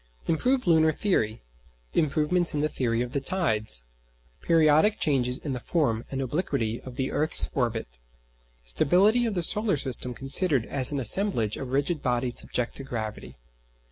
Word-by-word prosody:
Improved 250 - 0
lunar 160 -2 +3
theory. 115 - -1 0.5
Improvements 155 +3 +1
in 145 - -1
the 155 - +1
theory 120 -4 -1
of 125 - -7
the 140 - -2
tides. 110 - 0 0.6
Periodic 160 +5 +3
changes 130 -4 0
in 145 -2 -5
the 125 - -4
form 120 -7 -1
and 135 - -5
obliquity 130 -6 -3
of 130 -2 -11
the 130 0 -3
earth's 155 +1 +1
orbit. 115 - -3 0.7
Stability 195 - +3
of 215 - -3
the 175 - 0
solar 205 -1 +5
system 125 -2 0
considered 135 - +2
as 130 -1 -1
an 145 - -2
assemblage 125 - +1
of 135 - -7
rigid 140 +4 -1
bodies 125 0 0
subject 125 -1 -3
to 135 - -7
gravity. 110 -5 -7
140 Hz, 155 wpm, -26 LUFS, 120-165 Hz, 0.7 s, solar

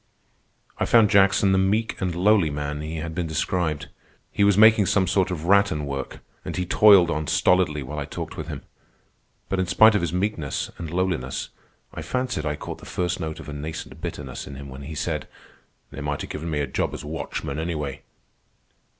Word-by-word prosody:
I - - +2
found 115 -3 +5
Jackson 100 0 +4
the 95 - +3
meek 105 +4 0
and 90 -2 -1
lowly 95 -2 +4
man 75 0 -4
he 80 +1 -5
had 80 +1 -4
been 85 0 -2
described. 80 -1 -1 0.4
He 100 - +1
was 100 -1 +4
making 110 -2 +6
some 95 -2 +3
sort 90 +1 +1
of 85 -3 -4
rattan 100 -6 +3
work, 70 -1 -5 0.2
and - - -5
he 90 - -1
toiled 95 -2 +6
on 75 0 -2
stolidly 80 -5 +2
while 75 +4 -6
I 70 - -3
talked - - -6
with - - -6
him. - - -6 0.8
But 95 - -1
in 95 - 0
spite 110 +4 +6
of 105 - +1
his 85 - -1
meekness 90 -6 -2
and 85 - -5
lowliness, 85 -7 -2 0.4
I - - -6
fancied 110 -3 -2
I 75 - -1
caught - - -7
the - - -17
first 90 -1 -2
note 80 -1 -4
of - - -10
a 75 - -6
nascent 80 +2 -7
bitterness 65 -1 -6
in - - -8
him 70 0 -9
when 65 +1 -9
he 75 +3 -7
said: - - -3 0.6
"They - - -7
might 75 -1 -3
a - - -4
given 80 +2 -6
me 75 -2 -1
a - - 0
job 65 - -2
as - - -8
watchman, 75 -1 -4
anyway." 75 -5 -3
85 Hz, 200 wpm, -24 LUFS, 75-95 Hz, 0.8 s, making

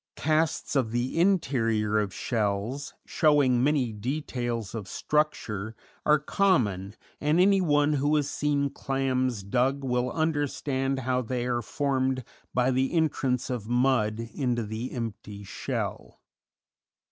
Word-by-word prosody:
Casts 155 -1 0
of 130 -5 +2
the 120 +7 -1
interior 115 - +2
of 105 -2 -1
shells, 110 +6 -2
showing 140 -6 +3
many 135 -5 +1
details 120 -2 -3
of 110 -4 -5
structure, 110 -7 -1 0.3
are 150 0 +6
common, 115 - +1 0.2
and 150 +3 +2
anyone 170 -6 +4
who 145 +2 +2
has 145 -2 +1
seen 145 -1 0
clams 130 -5 -1
dug 130 +7 +1
will 125 -1 0
understand 145 -4 -1
how 125 0 0
they 125 0 -2
are 120 -1 0
formed 130 0 -1 0.3
by 125 +1 +2
the 130 +1 +1
entrance 135 -6 0
of 115 -3 -4
mud 120 -3 +1
into 125 -4 0
the 110 +4 -5
empty 105 -3 -6
shell. 100 - -4
130 Hz, 125 wpm, -27 LUFS, 115-145 Hz, 0.3 s, are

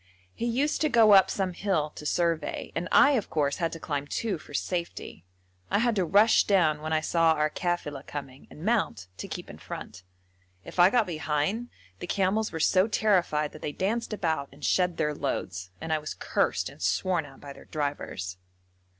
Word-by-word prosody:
He 235 - -3
used 275 +6 0
to 310 - +3
go 230 -4 +6
up 195 -2 +7
some 190 -2 -1
hill 170 -6 -1
to 150 - -7
survey, 165 -2 -1
and 175 - -2
I, 290 - +7
of 245 -8 0
course, 145 -2 0
had 165 -2 -1
to 165 - -6
climb 145 -2 -3
too 200 +1 -2
for - - -15
safety. 170 - -4 0.4
I - - +2
had 235 +1 +2
to 190 - +2
rush 205 +6 +5
down 160 -7 +3
when 155 +1 -4
I 155 -1 +2
saw 165 0 +3
our 150 0 0
kafila 150 -6 -3
coming 140 -2 -8
and 155 - -10
mount, 215 - 0
to - - -6
keep - - -6
in - - -11
front. 90 - -8 0.6
If - - -8
I 175 +1 +8
got 230 +1 +3
behind, 165 +7 -1 0.3
the - - -6
camels 205 +3 +1
were 160 - -4
so 185 +5 +4
terrified 180 -9 +1
that 155 - -12
they 145 - -4
danced 225 +8 -1
about 160 -9 -1
and 140 +2 -8
shed 180 -2 +2
their 150 0 0
loads, 95 -9 -3
and 160 0 -2
I 155 - +1
was 150 - -6
cursed - - 0
and - - -12
sworn 155 - 0
at 135 -1 -15
by 140 -1 -9
their - - -15
drivers. 140 - -4
165 Hz, 200 wpm, -27 LUFS, 150-200 Hz, 0.6 s, I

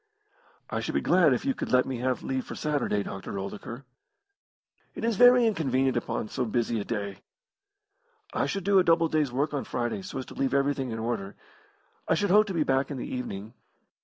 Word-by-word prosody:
"I - - -1
should - - -3
be - - +2
glad 175 -5 +4
if 130 - 0
you 270 - +2
could - - -5
let 125 0 +4
me 130 - -3
have 125 0 -1
leave 130 -1 -2
for - - -7
Saturday, 140 -9 0
Dr. 95 +1 -6
Oldacre." 105 +6 -6 1.1
"It - - -6
is 230 -1 +1
very 245 +2 +7
inconvenient 135 - +1
upon 120 -2 -2
so 125 - -2
busy 115 0 0
a - - -2
day." 100 -3 -4 1.1
"I - - 0
should 195 -1 -3
do 195 0 +4
a - - +4
double 165 -1 +3
day's 155 -4 +1
work 145 +5 -1
on 140 - -1
Friday 120 +9 -2
so 185 -6 -7
as 130 - -4
to - - -11
leave 135 0 0
everything 140 -1 +1
in 115 - -4
order. 110 -4 -3 0.7
I - - +3
should 205 -3 0
hope 210 +2 +6
to 195 - -3
be 160 - +2
back 135 -1 +1
in 145 - -4
the - - -4
evening." 110 -4 -5
135 Hz, 210 wpm, -27 LUFS, 120-165 Hz, 1.1 s, very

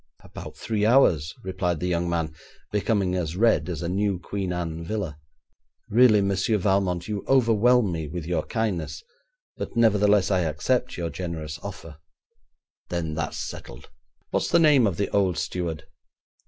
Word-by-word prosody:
'About - - -10
three 105 -2 -2
hours,' 105 - +4
replied 95 -3 -2
the 90 - -3
young 85 -1 0
man, 80 -2 -1 0.4
becoming 100 -3 +1
as 85 -3 -2
red 115 -3 +3
as 85 -1 -4
a - - -2
new 100 +1 0
Queen 95 +1 -4
Anne 85 -2 -3
villa. 85 -5 -4 0.7
'Really, 110 -2 +6
Monsieur 100 +2 +1
Valmont, 95 -3 0
you 105 -2 -3
overwhelm 120 -3 +4
me 80 -2 -3
with 85 +1 -5
your 85 -2 0
kindness, 110 - -2 0.5
but - - -6
nevertheless 105 -3 +4
I 95 - +3
accept 90 - -1
your 85 -2 -3
generous 80 -3 -5
offer.' 85 -6 -9 0.9
'Then 85 -3 -2
that's 80 -1 -3
settled. - - -8 0.4
What's - - 0
the - - +4
name 150 -8 +5
of 90 -4 -2
the 100 - -1
old 95 -5 +2
steward?' 85 -3 -3
95 Hz, 155 wpm, -25 LUFS, 85-105 Hz, 0.9 s, Really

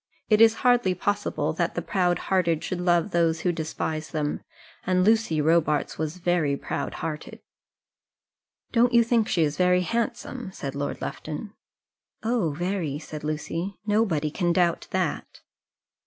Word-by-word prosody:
It 215 0 +5
is 225 0 +7
hardly 245 -7 +4
possible 205 -1 -1
that - - -1
the - - -1
proud 180 -2 +1
hearted 170 -4 0
should 180 -2 -3
love 175 +2 +2
those 165 -2 +2
who 180 - +2
despise 160 -1 -3
them; 150 -2 -2 0.4
and 185 0 +2
Lucy 220 -6 +3
Robarts 155 -2 +2
was 160 +2 -2
very 170 -5 +1
proud 140 - -4
hearted. 155 -2 -5 1.3
"Don't 240 +1 +3
you 235 - +7
think 230 -1 +2
she 170 - +2
is 145 -1 -1
very 180 0 +4
handsome?" 230 +2 -3
said 140 -6 -5
Lord 145 0 -4
Lufton. 175 +7 -6 0.7
"Oh, 225 -6 +1
very," 170 -1 -2
said 155 0 -8
Lucy. 165 +5 -3
"Nobody 200 -9 +1
can 175 +1 0
doubt 170 -1 +1
that." 185 -4 -2
175 Hz, 145 wpm, -26 LUFS, 155-205 Hz, 1.3 s, is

